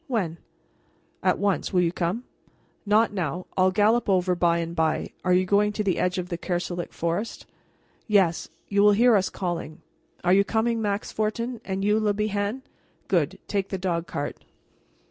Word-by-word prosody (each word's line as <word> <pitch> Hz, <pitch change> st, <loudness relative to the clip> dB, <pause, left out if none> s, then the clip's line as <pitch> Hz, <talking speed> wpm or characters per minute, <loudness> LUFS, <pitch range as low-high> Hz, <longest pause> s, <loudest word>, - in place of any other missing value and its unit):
"When?" 190 Hz, -, -2 dB, 0.8 s
"At -, -, +2 dB
once. 200 Hz, -2 st, 0 dB
Will 180 Hz, -2 st, +3 dB
you 170 Hz, -1 st, +2 dB
come?" 180 Hz, +7 st, -2 dB, 0.6 s
"Not 215 Hz, +1 st, +3 dB
now. 180 Hz, -2 st, -3 dB
I'll 185 Hz, 0 st, +4 dB
gallop 210 Hz, +4 st, +2 dB
over 185 Hz, -1 st, +3 dB
by 170 Hz, -1 st, +2 dB
and 170 Hz, 0 st, -3 dB
bye. 160 Hz, -2 st, 0 dB
You 180 Hz, 0 st, +3 dB
are -, -, -4 dB
going 205 Hz, +2 st, +3 dB
to 210 Hz, -, -1 dB
the 190 Hz, -4 st, 0 dB
edge 180 Hz, +1 st, 0 dB
of 180 Hz, -1 st, -3 dB
the 170 Hz, -, -4 dB
Kerselec 175 Hz, -1 st, -3 dB
forest?" 170 Hz, +7 st, -3 dB, 0.6 s
"Yes; 195 Hz, -6 st, +2 dB, 0.2 s
you 200 Hz, 0 st, +2 dB
will 205 Hz, 0 st, +6 dB
hear 235 Hz, +2 st, +5 dB
us 190 Hz, -2 st, +2 dB
calling. 175 Hz, -4 st, -4 dB, 0.4 s
Are 180 Hz, +1 st, +4 dB
you 200 Hz, +1 st, +5 dB
coming, 225 Hz, +2 st, 0 dB
Max 205 Hz, -1 st, -2 dB
Fortin? 230 Hz, +2 st, -2 dB
And 195 Hz, 0 st, -3 dB
you, 210 Hz, +1 st, +3 dB
Le 210 Hz, -2 st, +1 dB
Bihan? 210 Hz, +4 st, -1 dB, 0.4 s
Good; -, -, +1 dB
take 195 Hz, -2 st, -1 dB
the 190 Hz, -, -2 dB
dog 175 Hz, -2 st, -2 dB
cart." 145 Hz, -, -5 dB
195 Hz, 175 wpm, -25 LUFS, 175-210 Hz, 0.8 s, will